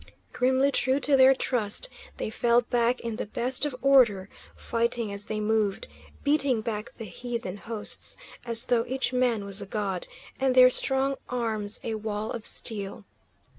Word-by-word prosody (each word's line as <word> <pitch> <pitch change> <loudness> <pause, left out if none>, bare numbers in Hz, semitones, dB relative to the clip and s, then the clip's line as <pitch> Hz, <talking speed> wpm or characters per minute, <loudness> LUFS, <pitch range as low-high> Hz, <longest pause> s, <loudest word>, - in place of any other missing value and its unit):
Grimly 260 +2 +2
true 260 +1 +2
to 290 - +3
their 265 0 +7
trust, 240 - -1 0.3
they - - -4
fell 235 +1 +3
back 240 +1 0
in 230 -2 -4
the - - -4
best 250 +6 0
of 275 - -6
order, 235 -9 +4 0.3
fighting 235 -2 -1
as 200 +1 -2
they 215 - -3
moved, 210 -2 0 0.4
beating 280 -5 +2
back 215 -1 -5
the 225 - -8
heathen 235 -5 -5
hosts, 220 0 -1 0.3
as 230 -1 0
though 235 -2 +2
each 260 +1 -1
man 245 -5 +1
was 200 0 -1
a 200 - -7
god, 195 -3 -3 0.3
and 265 -1 +1
their 255 0 +8
strong 270 +1 +1
arms 220 -4 -2
a 225 - -3
wall 215 0 -3
of 230 - -4
steel. 205 -2 -3
235 Hz, 165 wpm, -27 LUFS, 215-255 Hz, 0.4 s, their